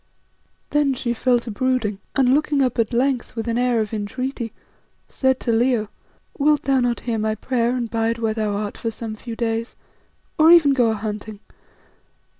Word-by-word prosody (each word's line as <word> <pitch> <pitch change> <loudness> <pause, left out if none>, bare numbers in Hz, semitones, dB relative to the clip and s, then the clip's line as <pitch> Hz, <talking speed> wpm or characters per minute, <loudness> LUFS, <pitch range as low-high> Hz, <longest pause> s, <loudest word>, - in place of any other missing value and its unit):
Then 290 -2 +2
she 240 -2 -1
fell 245 +1 +2
to 235 -1 -5
brooding, 225 -3 -1 0.2
and 260 -2 +4
looking 290 -1 +2
up 250 -2 -1
at 225 0 +1
length 250 0 0
with 225 -1 -4
an 230 +1 0
air 245 -2 +2
of 215 0 -4
entreaty, 235 +3 -4 0.6
said 265 -1 +1
to 235 - 0
Leo 230 -2 +1 0.5
"Wilt 295 +1 +3
thou 270 -1 +2
not 245 -1 0
hear 230 -2 -2
my 215 0 0
prayer 240 +2 0
and 240 -2 -2
bide 225 0 -1
where 225 -1 -1
thou 215 -2 -1
art 205 0 -4
for 230 - -2
some 225 0 -6
few 230 +1 -7
days, 230 0 -2 0.6
or 315 +1 +7
even 325 -5 +7
go 245 -4 +3
a 220 - 0
hunting? 210 0 -6
235 Hz, 185 wpm, -22 LUFS, 220-260 Hz, 0.6 s, or